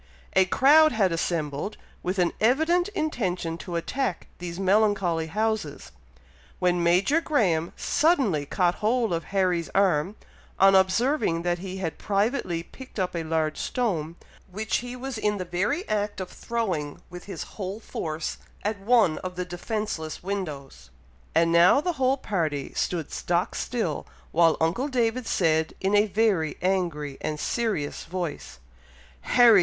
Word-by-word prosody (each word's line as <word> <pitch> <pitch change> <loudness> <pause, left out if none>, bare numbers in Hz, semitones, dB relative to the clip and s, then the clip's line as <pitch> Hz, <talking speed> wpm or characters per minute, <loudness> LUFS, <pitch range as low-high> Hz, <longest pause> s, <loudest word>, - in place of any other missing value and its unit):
A 190 - +5
crowd 300 - +6
had 200 -5 +2
assembled, 165 +2 -2 0.2
with 185 +2 -2
an 175 -2 +2
evident 320 +10 +3
intention 185 - -1
to 175 0 -6
attack 220 +5 -2
these 175 0 -6
melancholy 195 -4 +2
houses, 210 -3 -2 0.7
when 180 -1 +1
Major 185 - +3
Graham 180 - +1
suddenly 270 - +2
caught 175 +2 +2
hold 225 -1 +1
of 165 -1 -2
Harry's 180 -4 0
arm, 190 -1 +2 0.4
on 195 +1 +6
observing 190 - +2
that 175 0 0
he 190 +1 -6
had 175 -4 -4
privately 200 -4 0
picked 260 +8 -13
up 185 -2 -1
a 170 - -1
large 160 -1 -1
stone, 170 -10 -1 0.4
which 215 +3 -1
he 245 +1 -6
was 255 -2 -5
in 210 -1 0
the 185 - -4
very 205 - -1
act 205 -1 -1
of 185 -1 -5
throwing 185 -11 -3
with 180 0 -9
his 190 -6 -5
whole 195 +1 -6
force 160 -7 -4 0.2
at 210 0 -1
one 210 -5 +3
of 185 0 -6
the 180 0 -3
defenceless 175 -3 -4
windows. 150 - -5 0.5
And 165 +1 +4
now 170 +9 +6
the 355 +4 -1
whole 260 +1 +3
party 160 - -2
stood 165 -4 -2
stock 175 0 -1
still, 220 - -2 0.2
while 165 0 +4
uncle 170 - +1
David 245 -2 0
said 160 -2 +1
in 195 +1 0
a 205 +1 +5
very 200 -7 +1
angry 170 -7 -1
and 150 -1 -3
serious 215 -12 -2
voice, 170 - -5 0.8
"Harry! 235 -4 +8
185 Hz, 145 wpm, -26 LUFS, 165-220 Hz, 0.8 s, Harry